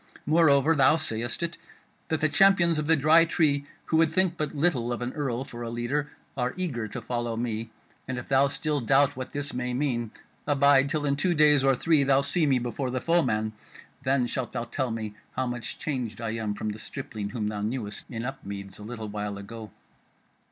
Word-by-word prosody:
Moreover, 155 Hz, -1 st, +4 dB
thou 140 Hz, 0 st, +5 dB
sayest 120 Hz, -3 st, -1 dB
it 170 Hz, 0 st, -3 dB, 0.5 s
that 160 Hz, -, -1 dB
the 155 Hz, -, +4 dB
champions 170 Hz, 0 st, +4 dB
of 150 Hz, -, -2 dB
the 165 Hz, -, +5 dB
Dry 155 Hz, +3 st, +6 dB
Tree, 150 Hz, -4 st, +1 dB, 0.2 s
who 160 Hz, -, +1 dB
would 160 Hz, -1 st, +4 dB
think 185 Hz, 0 st, +2 dB
but 150 Hz, -2 st, -3 dB
little 140 Hz, -6 st, +1 dB
of 120 Hz, -, -2 dB
an 120 Hz, -, -3 dB
earl 135 Hz, -4 st, -2 dB
for 120 Hz, -3 st, -9 dB
a 120 Hz, -, -4 dB
leader, 120 Hz, +5 st, -2 dB, 0.3 s
are 125 Hz, -1 st, -1 dB
eager 135 Hz, -12 st, -2 dB
to 120 Hz, +2 st, -7 dB
follow 120 Hz, -1 st, -2 dB
me: 115 Hz, -1 st, -3 dB, 0.4 s
and 130 Hz, -1 st, -3 dB
if 125 Hz, -, -6 dB
thou 135 Hz, +1 st, +4 dB
still 150 Hz, +1 st, -1 dB
doubt 135 Hz, +4 st, +3 dB
what 130 Hz, 0 st, -6 dB
this 145 Hz, 0 st, -4 dB
may 125 Hz, 0 st, -2 dB
mean, 125 Hz, -5 st, -1 dB, 0.4 s
abide, 140 Hz, -1 st, +4 dB
till 150 Hz, -1 st, -1 dB
in 140 Hz, -1 st, +1 dB
two 175 Hz, +3 st, +1 dB
days 150 Hz, -2 st, +5 dB
or 135 Hz, -1 st, +4 dB
three 155 Hz, +3 st, +3 dB
thou 135 Hz, 0 st, +4 dB
see 155 Hz, +2 st, +1 dB
me 135 Hz, -2 st, +4 dB
before 125 Hz, +2 st, -3 dB
the 130 Hz, +1 st, -1 dB
foeman. 120 Hz, -10 st, +1 dB, 0.5 s
Then 130 Hz, -1 st, +2 dB
shalt 125 Hz, 0 st, -3 dB
thou 120 Hz, -, -2 dB
tell 130 Hz, +1 st, -2 dB
me 110 Hz, -2 st, -4 dB, 0.2 s
how 130 Hz, -, 0 dB
much 120 Hz, -2 st, -4 dB
changed 125 Hz, -8 st, -3 dB
I 115 Hz, -2 st, -2 dB
am 110 Hz, -2 st, -2 dB
from 110 Hz, -, -3 dB
the 105 Hz, +1 st, -5 dB
stripling 105 Hz, -1 st, -5 dB
whom 105 Hz, -3 st, -2 dB
thou 105 Hz, -1 st, -4 dB
knewest 105 Hz, -1 st, -4 dB
in 115 Hz, -1 st, -4 dB
Upmeads 100 Hz, -8 st, -7 dB
a -, -, -9 dB
little 110 Hz, 0 st, -6 dB
while 105 Hz, -1 st, -4 dB
ago." 110 Hz, +2 st, -8 dB
130 Hz, 210 wpm, -27 LUFS, 115-150 Hz, 0.5 s, Dry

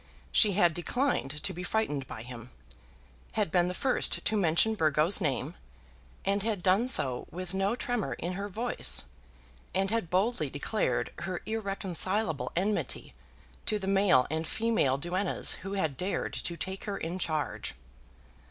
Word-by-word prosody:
She 210 Hz, -3 st, +5 dB
had 175 Hz, -3 st, +4 dB
declined 175 Hz, -, -1 dB
to -, -, -1 dB
be 180 Hz, -, -6 dB
frightened 175 Hz, -9 st, -1 dB
by 110 Hz, -, -7 dB
him; 120 Hz, -1 st, -9 dB, 0.8 s
had 210 Hz, -7 st, 0 dB
been 175 Hz, -1 st, +4 dB
the 180 Hz, -, -3 dB
first 260 Hz, +5 st, +1 dB
to 220 Hz, -, +2 dB
mention 195 Hz, +3 st, +3 dB
Burgo's 160 Hz, +1 st, +3 dB
name, 140 Hz, -7 st, -1 dB, 0.7 s
and 200 Hz, +1 st, +2 dB
had 210 Hz, -4 st, -1 dB
done 195 Hz, +6 st, +4 dB
so 130 Hz, -, +2 dB
with 185 Hz, +1 st, -6 dB
no 195 Hz, +4 st, +1 dB
tremor 245 Hz, -4 st, -1 dB
in 175 Hz, +2 st, -3 dB
her 200 Hz, +2 st, -4 dB
voice, 235 Hz, +5 st, 0 dB, 0.7 s
and 195 Hz, +1 st, +1 dB
had 225 Hz, -7 st, 0 dB
boldly 185 Hz, -, +1 dB
declared 145 Hz, +11 st, -1 dB
her 180 Hz, 0 st, -4 dB
irreconcilable 195 Hz, -, 0 dB
enmity 200 Hz, +4 st, -1 dB, 0.5 s
to 215 Hz, -, +2 dB
the 195 Hz, -, -5 dB
male 195 Hz, -10 st, +4 dB
and 160 Hz, 0 st, -1 dB
female 220 Hz, -, +2 dB
duennas 180 Hz, +6 st, 0 dB
who 195 Hz, +2 st, -5 dB
had 160 Hz, -9 st, -1 dB
dared 190 Hz, +2 st, -2 dB
to 170 Hz, -, -4 dB
take 190 Hz, +2 st, -5 dB
her 200 Hz, -1 st, -2 dB
in 170 Hz, +3 st, -4 dB
charge. 155 Hz, -4 st, -2 dB
185 Hz, 150 wpm, -30 LUFS, 160-210 Hz, 0.8 s, She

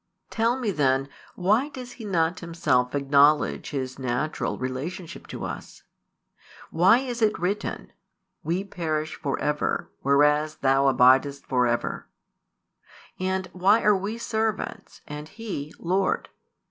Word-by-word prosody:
Tell 230 Hz, +2 st, +1 dB
me 225 Hz, -5 st, 0 dB
then, 135 Hz, -4 st, +1 dB, 0.3 s
why 215 Hz, +10 st, +2 dB
does 255 Hz, -4 st, -8 dB
He 235 Hz, -3 st, -10 dB
not 170 Hz, -3 st, 0 dB
Himself 145 Hz, -7 st, 0 dB
acknowledge 145 Hz, +2 st, +3 dB
His 130 Hz, -2 st, -4 dB
natural 130 Hz, +4 st, -2 dB
relationship 140 Hz, +7 st, -5 dB
to -, -, -6 dB
us? -, -, -8 dB, 0.9 s
Why 185 Hz, +7 st, +5 dB
is 245 Hz, -2 st, -4 dB
it 215 Hz, -1 st, +3 dB
written: 195 Hz, +4 st, -3 dB, 0.5 s
We 170 Hz, +5 st, -1 dB
perish 155 Hz, -5 st, -3 dB
for 140 Hz, -, -3 dB
ever, 150 Hz, 0 st, -1 dB
whereas 150 Hz, +2 st, +3 dB
Thou 135 Hz, 0 st, +3 dB
abidest 135 Hz, +2 st, +4 dB
for 125 Hz, -2 st, +2 dB
ever? 120 Hz, 0 st, -2 dB, 1.1 s
And 190 Hz, 0 st, -1 dB
why 195 Hz, +5 st, +3 dB
are 210 Hz, -1 st, +5 dB
we 200 Hz, +4 st, -3 dB
"servants" 220 Hz, -2 st, -3 dB
and 150 Hz, +1 st, -7 dB
He 180 Hz, -9 st, -6 dB
"Lord 185 Hz, +3 st, 0 dB
160 Hz, 125 wpm, -25 LUFS, 140-200 Hz, 1.1 s, Why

